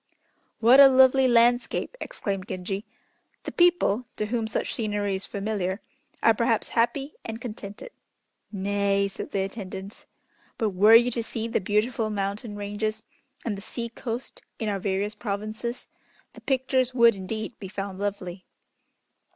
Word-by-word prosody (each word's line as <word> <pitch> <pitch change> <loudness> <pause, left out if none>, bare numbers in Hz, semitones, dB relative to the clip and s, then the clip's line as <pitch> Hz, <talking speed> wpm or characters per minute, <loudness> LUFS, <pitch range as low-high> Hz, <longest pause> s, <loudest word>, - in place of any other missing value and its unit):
"What 240 +4 +7
a 280 - +11
lovely 265 0 +6
landscape!" 240 - +3
exclaimed 195 -2 -4
Genji. 190 +3 -4 0.6
"The - - -5
people 345 - +3
to 215 - -1
whom 225 0 -1
such 220 - -2
scenery 205 -3 -1
is 190 +1 -3
familiar, 200 -2 -2 0.4
are 225 - +6
perhaps 230 0 +1
happy 270 +5 0
and 225 0 -6
contented." 215 - -8 0.6
"Nay," 200 0 +1
said 195 - -7
the 195 - -1
attendants, 195 0 -7 0.5
"but 220 - +1
were 205 +4 +7
you 240 +2 +6
to 235 - -1
see 225 0 -4
the 225 - 0
beautiful 215 +3 0
mountain 205 +2 -3
ranges 210 +2 -3 0.4
and 225 -4 -1
the 195 - -8
sea 235 +2 -5
coast 235 +1 -6 0.2
in 220 - -2
our 200 -1 -1
various 200 +2 -1
provinces, 215 +3 -4 0.5
the - - -13
pictures 260 -1 +1
would 235 -2 +6
indeed 215 +5 -5
be 195 - -6
found 195 0 -5
lovely." 195 -3 -4
215 Hz, 145 wpm, -26 LUFS, 200-235 Hz, 0.6 s, a